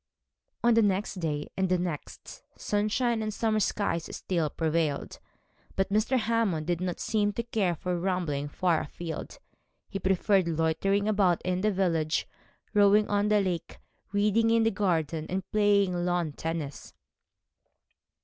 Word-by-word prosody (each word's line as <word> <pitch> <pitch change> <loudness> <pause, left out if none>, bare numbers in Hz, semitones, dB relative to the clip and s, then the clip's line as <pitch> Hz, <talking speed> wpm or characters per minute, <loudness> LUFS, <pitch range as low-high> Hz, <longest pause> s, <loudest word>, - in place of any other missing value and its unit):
On 240 0 +5
the 230 - +5
next 200 -1 0
day, 150 -3 -3
and 190 -1 0
the 185 - +3
next, 175 -4 -6 0.2
sunshine 220 +3 0
and 215 0 -2
summer 215 0 0
skies 195 -5 -1
still 170 -5 -1
prevailed; 160 -2 -1 0.6
but 195 +1 0
Mr. 220 +5 +2
Hammond 220 -9 0
did 175 +1 -1
not 180 -1 -2
seem 210 -2 +1
to 235 - -2
care 205 -7 0
for 180 +2 -2
rambling 170 -6 -1
far 170 +1 +1
afield. 165 +2 -7 0.5
He 195 - -4
preferred 190 0 +2
loitering 165 +5 +1
about 195 -5 +3
in 185 0 -1
the 215 +1 +2
village, 165 -5 0 0.5
rowing 210 0 +5
on 205 0 +2
the 210 -1 +3
lake, 180 -4 -3 0.3
reading 210 +3 +2
in 230 0 +4
the 225 - +3
garden, 165 -6 -1
and 190 0 -3
playing 205 -3 +3
lawn 175 -2 0
tennis. 160 -1 -5
190 Hz, 145 wpm, -28 LUFS, 170-210 Hz, 0.6 s, On